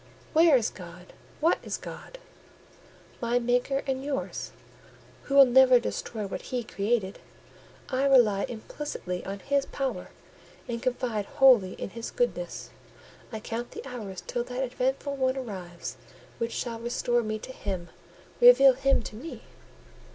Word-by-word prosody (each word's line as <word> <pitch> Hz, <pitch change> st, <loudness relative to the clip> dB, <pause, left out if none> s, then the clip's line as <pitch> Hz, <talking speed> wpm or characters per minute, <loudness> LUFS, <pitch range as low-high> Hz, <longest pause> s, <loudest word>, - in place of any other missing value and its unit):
"Where 320 Hz, -3 st, +6 dB
is 230 Hz, -, -1 dB
God? 180 Hz, -1 st, -12 dB, 0.3 s
What 330 Hz, +3 st, +3 dB
is -, -, -4 dB
God?" -, -, -10 dB, 1.0 s
"My 235 Hz, +1 st, +1 dB
Maker 245 Hz, +3 st, +1 dB
and 265 Hz, -1 st, -2 dB
yours, 280 Hz, -1 st, -4 dB, 0.7 s
who 275 Hz, -, -2 dB
will 275 Hz, -1 st, +10 dB
never 255 Hz, 0 st, +6 dB
destroy 220 Hz, -2 st, -4 dB
what 195 Hz, -, -5 dB
He 250 Hz, -2 st, -3 dB
created. 205 Hz, -2 st, -1 dB, 0.7 s
I 260 Hz, +1 st, 0 dB
rely 235 Hz, -8 st, +5 dB
implicitly 220 Hz, -6 st, -5 dB
on 195 Hz, +1 st, -4 dB
His 280 Hz, 0 st, 0 dB
power, 260 Hz, -9 st, -3 dB, 0.6 s
and 235 Hz, -1 st, -4 dB
confide 240 Hz, -5 st, -1 dB
wholly 255 Hz, -9 st, +5 dB
in -, -, -6 dB
His 230 Hz, +2 st, -6 dB
goodness: -, -, -2 dB, 0.6 s
I 220 Hz, -, -5 dB
count 230 Hz, +2 st, -5 dB
the -, -, -8 dB
hours 210 Hz, -8 st, -7 dB
till 240 Hz, -, -2 dB
that 250 Hz, +1 st, -3 dB
eventful 265 Hz, +2 st, -2 dB
one 260 Hz, 0 st, +1 dB
arrives 185 Hz, -9 st, -6 dB, 0.4 s
which 230 Hz, 0 st, -2 dB
shall 230 Hz, -2 st, -3 dB
restore 240 Hz, +1 st, 0 dB
me 215 Hz, -1 st, -3 dB
to 240 Hz, -, -9 dB
Him, 185 Hz, -7 st, -5 dB, 0.5 s
reveal 485 Hz, -, +8 dB
Him 270 Hz, -1 st, +2 dB
to 215 Hz, -, -8 dB
me." 290 Hz, +10 st, -8 dB
245 Hz, 145 wpm, -27 LUFS, 215-270 Hz, 1.0 s, will